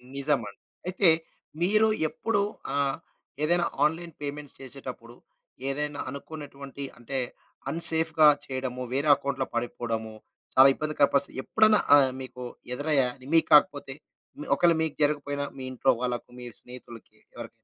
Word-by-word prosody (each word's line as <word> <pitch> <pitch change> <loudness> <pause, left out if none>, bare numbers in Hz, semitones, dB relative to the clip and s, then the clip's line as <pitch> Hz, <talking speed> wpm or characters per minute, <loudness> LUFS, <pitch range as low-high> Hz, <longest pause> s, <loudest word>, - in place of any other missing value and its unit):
నిజమండి. 135 -7 -2 0.3
అయితే, 185 0 +4 0.5
మీరు 215 +4 +4 0.2
ఎప్పుడు 215 +3 -1 0.3
ఆహ్, 140 -1 0 0.5
ఏదైనా 175 +2 +3 0.2
ఆన్‌లైన్ 165 +2 -2
పేమెంట్స్ 145 0 -6
చేసేటప్పుడు, 130 -3 -9 0.5
ఏదైనా 145 +1 -2
అనుకున్నటువంటి, 140 -1 -8
అంటే 130 +3 -3 0.5
అన్‌సేఫ్‌గా 160 -1 +4 0.2
చేయడము, 130 -1 -4
వేరే 145 +3 +1
అకౌంట్లో 140 -1 -3
పడిపోవడము 115 -2 -3 0.4
చాలా 130 +1 +9
ఇబ్బందికర 155 -1 +1
పరిస్థితి 140 -1 0
ఎప్పుడన్నా 215 -1 +4 0.2
ఆహ్, 140 -2 +5
మీకు 125 -1 -8 0.3
ఎదురయ్యా? 145 -1 +1 0.3
మీకు 165 - +4
కాకపోతే 145 -2 +4 0.6
ఒకళ్ళు 170 +2 +4
మీకు 160 -2 -1
జరగకపోయినా, 145 -1 0
మీ 130 - -7
ఇంట్లో 130 - +2
వాళ్ళకి, 125 -1 -3
మీ 125 - -9 0.2
స్నేహితులకి 120 -3 -13 0.2
ఎవరికైనా? 120 - -7
140 Hz, 120 wpm, -27 LUFS, 130-155 Hz, 0.6 s, చాలా